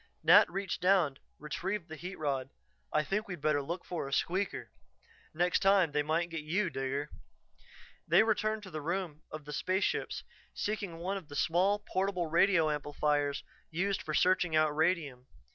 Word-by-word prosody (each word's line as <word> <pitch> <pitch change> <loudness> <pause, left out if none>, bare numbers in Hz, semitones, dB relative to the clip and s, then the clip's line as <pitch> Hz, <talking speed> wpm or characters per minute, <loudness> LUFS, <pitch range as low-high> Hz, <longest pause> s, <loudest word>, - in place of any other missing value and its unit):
Nat - - +7
reached 195 -1 -3
down, 180 -7 +3 0.2
retrieved 175 +5 -4
the 160 - -7
heat 180 +4 -7
rod. 135 -3 -2 0.4
"I 150 - +2
think 210 +7 -2
we'd 180 -4 -6
better 150 0 +1
look 170 +6 -5
for 170 -6 -4
a - - -8
'squeaker'. 185 +7 -1 0.6
Next 175 +3 +1
time 195 -5 +4
they 150 +1 +1
might 165 +3 0
get 165 -1 -3
you, 170 +4 0
Digger." 135 +2 -3 1.0
They - - +6
returned 215 -1 0
to 190 - -10
the 155 -1 -4
room 170 -1 -3
of 155 -1 -8
the 150 - -7
spaceships, 185 +6 -1 0.3
seeking 205 -5 -3
one 185 +4 -2
of 180 -6 -9
the 145 - -9
small, 175 +7 +2
portable 195 -3 -1
radio 165 -1 +3
amplifiers 145 -1 0 0.3
used 190 +4 -1
for 155 - -3
searching 180 -3 +3
out 155 -1 +3
radium. 155 -6 0
170 Hz, 165 wpm, -32 LUFS, 150-190 Hz, 1.0 s, Nat